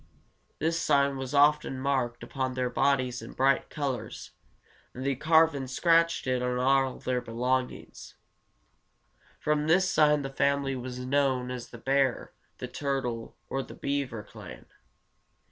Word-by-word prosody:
This 165 +2 0
sign 140 0 +2
was 135 +1 -5
often 145 -1 +3
marked 130 -3 -1
upon 130 -2 -3
their 125 -1 -1
bodies 130 -2 +1
in - - -10
bright 135 0 +2
colors, 140 -4 -4 0.6
and 130 +1 -6
they 140 - +2
carved 160 +3 +4
and 135 -2 -5
scratched 165 +4 +2
it 130 -1 0
on 125 0 -1
all 135 +1 +2
their 125 -1 -2
belongings. 125 +2 -3 1.2
From 150 0 0
this 185 +3 +4
sign 150 -1 +4
the 135 - -5
family 140 0 +1
was 125 0 -6
known 130 -1 0
as 125 -2 -6
the 120 - -10
bear, 135 +1 0 0.2
the - - -5
turtle, 130 -5 -3
or 135 - -2
the - - -10
beaver 140 -6 -3
clan. - - -12
135 Hz, 145 wpm, -28 LUFS, 125-140 Hz, 1.2 s, carved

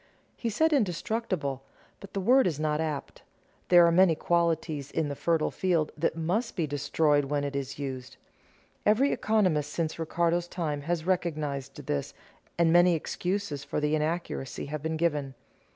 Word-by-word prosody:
He 235 - -3
said 315 +9 +2
"indestructible," 185 - -1 0.4
but 200 - -12
the 195 - -1
word 250 +5 +4
is 155 -5 -2
not 155 0 0
apt. 155 -3 -4 0.5
There 175 -1 +7
are 170 - +4
many 175 -1 +5
qualities 160 -4 0
in 150 +1 -1
the 140 - -4
fertile 165 +1 +1
field 170 -5 0
that 155 - 0
must 190 +9 -1
be 170 -5 0
destroyed 145 0 +1
when 145 +1 -1
it 140 -1 -3
is 135 0 -4
used. 130 -3 -6 0.7
Every 250 +7 +3
economist 180 -10 +1
since 165 0 -2
Ricardo's 170 +1 0
time 155 -5 -3
has 170 -2 0
recognized 155 -7 -2
this, 70 -1 -3 0.4
and 170 -1 +4
many 175 0 +6
excuses 175 -2 -3
for - - -3
the 150 0 0
inaccuracy 155 -3 -2
have 150 +1 -5
been 160 +1 -2
given. 145 -5 -1
160 Hz, 160 wpm, -28 LUFS, 145-180 Hz, 0.7 s, There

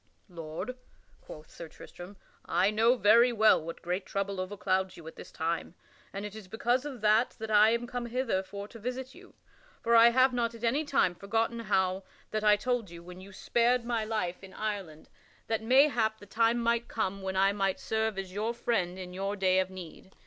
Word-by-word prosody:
"Lord," 165 +8 -6 0.4
quoth 155 0 -12
Sir 170 - -9
Tristram, 180 +4 -12 0.3
"I 195 - +2
know 225 +3 +3
very 235 +2 +5
well 220 -5 +4
what 165 +1 -8
great 180 +3 -2
trouble 200 0 -3
overclouds 190 0 -2
you 165 - -12
at 160 - -9
this - - -11
time, 165 +2 -3 0.4
and 200 +1 -5
it 210 0 -8
is 215 -3 -10
because 240 +6 0
of 265 -6 -7
that 215 +3 +3
that 220 -1 -6
I 210 +1 +6
am 235 +1 0
come 240 0 -5
hither 235 -5 -1
for 200 +1 -8
to 230 - -12
visit 255 +3 -5
you. - - -17 0.5
For 235 0 +3
I 230 +1 +8
have 255 +2 +3
not 235 -1 -1
at 230 - -13
any 275 +7 +1
time 265 -10 +2
forgotten 225 +5 -1
how 190 -3 0 0.3
that 215 0 -2
I 210 -1 +6
told 235 -1 -2
you 170 0 -11
when 180 +1 -11
you 195 +1 -12
spared 235 +4 +1
my 235 -2 -1
life 205 -5 -3
in 190 -1 -12
Ireland 195 -8 -5 0.4
that 225 -1 -1
mayhap 240 -2 +3
the 205 - -14
time 230 +3 +2
might 235 0 0
come 195 -3 -3
when 190 0 -4
I 195 +1 +3
might 195 -2 -1
serve 220 -2 -1
as 190 -1 -5
your 220 +4 -2
friend 190 -7 -1
in 180 -1 -8
your 195 +2 -3
day 190 -1 +2
of 185 0 0
need. 185 0 -11
210 Hz, 205 wpm, -29 LUFS, 190-235 Hz, 0.5 s, I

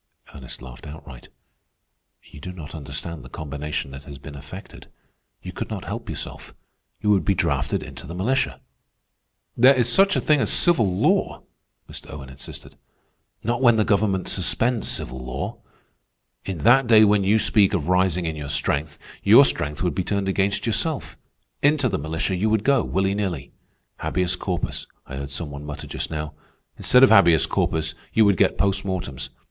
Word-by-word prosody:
Ernest 65 -3 -9
laughed 65 +1 -11
outright. 75 -4 -11 1.0
"You 75 - -14
do 90 - -7
not 80 -5 -10
understand 75 +1 -6
the 65 - -12
combination 70 -1 -5
that 70 +1 -10
has 70 - -10
been 75 +2 -11
effected. 75 +8 -11 0.6
You - - -6
could - - -6
not - - -5
help - - -6
yourself. - - -7 0.5
You 105 - +2
would 100 -2 +3
be 100 - +1
drafted - - -1
into - - -10
the 85 - -7
militia." 125 +8 -1 0.9
"There 130 +3 +6
is 120 -2 +2
such 195 +10 +4
a - - +2
thing 150 -2 +2
as - - +1
civil 120 - +3
law," 90 - +1 0.4
Mr. - - -10
Owen 70 -3 -9
insisted. 65 - -9 0.7
"Not 120 +3 -1
when 120 -3 +6
the 110 - +3
government 100 -2 +1
suspends 115 +5 +1
civil 65 0 -3
law. 65 +1 -5 0.9
In 90 -5 -5
that 125 +3 +5
day 110 -2 +7
when 105 -1 +4
you 100 +3 +3
speak 110 -2 +3
of 80 -5 -2
rising 90 -1 +2
in 80 -1 -2
your 75 -2 -6
strength, 75 +1 -1 0.2
your - - +7
strength 75 +3 -1
would 90 - 0
be 95 - -1
turned 100 +1 -2
against 100 +1 0
yourself. 120 +7 0 0.5
Into 145 -2 +3
the 95 -7 -2
militia 80 +5 -2
you 105 +5 0
would 110 -1 +1
go, 135 -2 +3
willy 95 +1 0
nilly. 90 -9 -3 0.5
Habeas 90 0 0
corpus, 90 -1 -3 0.2
I 70 - -8
heard 70 0 -5
some 75 +2 -5
one 70 +1 -8
mutter 75 0 -7
just - - -4
now. 75 -1 -5 0.4
Instead 125 +1 +4
of 130 - +7
habeas 85 -6 +6
corpus 80 -1 -1 0.2
you 110 - +5
would 100 -3 +3
get - - +2
post 100 -1 +1
mortems. 80 -9 -4
90 Hz, 175 wpm, -23 LUFS, 75-110 Hz, 1.0 s, day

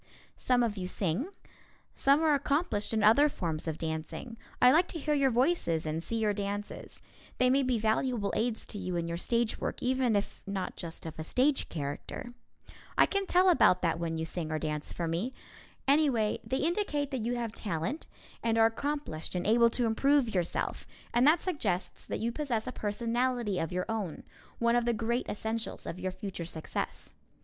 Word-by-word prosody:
Some 250 -1 +2
of 220 -3 -1
you 180 -1 -3
sing. 185 - -1 0.7
Some 280 +3 +4
are 310 -2 +5
accomplished 280 -6 0
in 220 -2 +1
other 280 +8 +6
forms 165 - -3
of 160 -1 -2
dancing. 160 +9 -4 0.2
I 250 - +7
like 335 +5 +4
to - - -6
hear 300 0 0
your 275 -2 +3
voices 245 - +1
and 155 +1 -2
see 230 - -4
your 215 -2 +2
dances. 205 0 -5 0.3
They 250 0 +4
may 275 +2 +4
be 255 -2 +1
valuable 220 0 0
aids 230 -1 -1
to 205 - -5
you 180 -2 -3
in 170 -1 -1
your 170 0 -2
stage 235 +3 0
work, - - -3
even 255 -3 +2
if 200 - -2
not 195 -2 -3
just 165 -2 -8
of 160 -1 -7
a - - -2
stage 265 - +1
character. 145 +10 -5 0.6
I - - +7
can 395 -1 -1
tell 365 +1 +4
about 215 - +5
that 165 -1 +1
when 165 -1 -2
you 160 - -2
sing 165 -1 -4
or 155 - 0
dance 150 -1 -3
for 170 - -3
me. 180 +11 -2 0.5
Anyway, 270 -7 +3
they 260 - -1
indicate 305 -4 0
that 260 -5 -2
you 240 +2 0
have 235 -2 -3
talent 200 - -3 0.3
and 230 -1 +1
are 225 - +6
accomplished 225 - -2
and 180 - -1
able 235 +2 +5
to 240 +1 0
improve 255 +2 +3
yourself, 175 -3 -1 0.3
and 245 +3 +5
that 315 +2 +5
suggests 215 - -2
that - - -3
you 230 +1 0
possess 240 -5 -2
a 255 - -3
personality 235 -1 -1
of 165 - -2
your 180 0 -1
own, 215 -8 -3 0.3
one 235 0 +3
of 240 -1 +2
the 240 - +2
great 235 +2 -1
essentials 220 +2 -3
of 180 - -5
your 185 0 -2
future 185 -2 -6
success. 160 -1 -5
225 Hz, 190 wpm, -30 LUFS, 180-260 Hz, 0.7 s, I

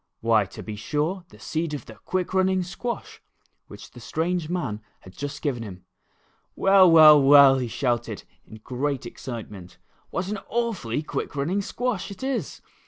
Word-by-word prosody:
Why, 110 -2 +3
to - - -10
be 110 - -6
sure, 155 - -2
the - - -16
seed 160 -1 -3
of 145 - -8
the 110 - -11
quick 180 - -3
running 190 0 +2
squash 215 +7 -6 0.5
which - - -12
the - - -13
strange 170 0 -2
man 135 -13 -3 0.2
had 95 - -14
just 145 0 -6
given 135 -6 -1
him. 95 -5 -9 0.7
"Well, 195 -1 +6
well, 155 -3 +8
w^ell," 135 -1 +7
he 125 - -2
shouted, 120 0 -2 0.2
in 110 0 -14
great 135 0 -3
ex 120 - -10
citement, 105 -8 -8 0.2
" - - -37
w^hat 185 +2 -3
an 210 - -3
awfully 210 - -2
quick 150 - -5
running 165 +8 0
squash 225 -1 -3
it 200 +4 -9
is. 255 - -3
150 Hz, 170 wpm, -25 LUFS, 120-185 Hz, 0.7 s, well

